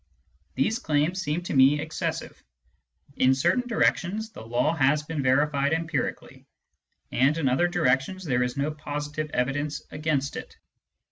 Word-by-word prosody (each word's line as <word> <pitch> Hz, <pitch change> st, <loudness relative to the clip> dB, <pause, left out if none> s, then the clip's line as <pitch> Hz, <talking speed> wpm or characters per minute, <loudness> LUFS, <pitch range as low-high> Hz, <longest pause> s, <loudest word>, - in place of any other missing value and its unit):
These 220 Hz, +12 st, +1 dB
claims 155 Hz, +5 st, 0 dB
seem 155 Hz, +2 st, -2 dB
to -, -, -4 dB
me 135 Hz, +2 st, +5 dB
excessive. 155 Hz, +1 st, -4 dB, 0.7 s
In 130 Hz, +1 st, +4 dB
certain 245 Hz, -, +1 dB
directions 220 Hz, -1 st, 0 dB
the -, -, -10 dB
law 120 Hz, +7 st, 0 dB
has 150 Hz, 0 st, +2 dB
been 150 Hz, -1 st, -3 dB
verified 140 Hz, +2 st, +2 dB
empirically, 165 Hz, 0 st, -3 dB, 0.6 s
and 135 Hz, +5 st, +3 dB
in 155 Hz, -4 st, 0 dB
other 155 Hz, +8 st, +2 dB
direc 135 Hz, -7 st, +3 dB
tions 185 Hz, +7 st, -8 dB
there 125 Hz, -7 st, 0 dB
is 125 Hz, +2 st, -1 dB
no 140 Hz, +2 st, 0 dB
positive 150 Hz, 0 st, -4 dB
evidence 145 Hz, +3 st, -2 dB
against 150 Hz, -2 st, -1 dB
it. -, -, -9 dB
150 Hz, 145 wpm, -26 LUFS, 135-165 Hz, 0.7 s, me